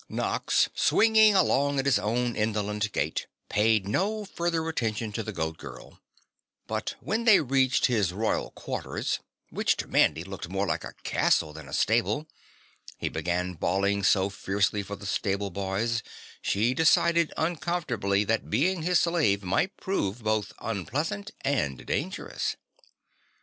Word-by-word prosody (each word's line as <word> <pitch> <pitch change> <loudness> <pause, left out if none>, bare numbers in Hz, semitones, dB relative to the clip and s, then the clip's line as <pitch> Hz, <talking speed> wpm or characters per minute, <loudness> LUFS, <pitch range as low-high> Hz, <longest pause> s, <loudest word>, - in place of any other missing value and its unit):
Nox - - +1
swinging 220 -1 +5
along 145 -6 +3
at 135 - 0
his 140 -2 +4
own 120 +3 -1
indolent 105 -1 -1
gait 80 -4 -2 0.2
paid 105 -1 +2
no 210 - 0
further 170 -4 -2
attention 115 -7 -2
to 115 - -3
the 110 - -5
Goat 80 -4 -3
Girl, - - -11 0.7
but - - -3
when 225 +2 -1
they 215 -4 +7
reached 135 -2 +2
his 105 -8 +2
royal 110 +4 -1
quarters, - - -3 0.3
which - - +1
to - - -4
Mandy 80 - +3
looked 95 -2 -7
more 95 +2 -1
like 80 -3 -2
a - - -8
castle 75 -2 +1
than 80 -2 -10
a - - -11
stable, 120 +7 +1 0.7
he - - -2
began 90 +3 -2
bawling 100 +4 0
so 100 0 +3
fiercely 100 +1 0
for 100 +1 -6
the 100 - -11
stable 100 0 -1
boys 100 +6 -1 0.4
she 110 +5 +1
decided 165 +2 +3
uncomfortably 155 - 0
that 110 +1 -1
being 170 - +1
his 175 +1 +3
slave 155 - +2
might 170 - 0
prove 115 - -2
both 110 -1 0
unpleasant 140 - -3
and 105 - -1
dangerous. - - -2
110 Hz, 145 wpm, -27 LUFS, 100-155 Hz, 0.7 s, they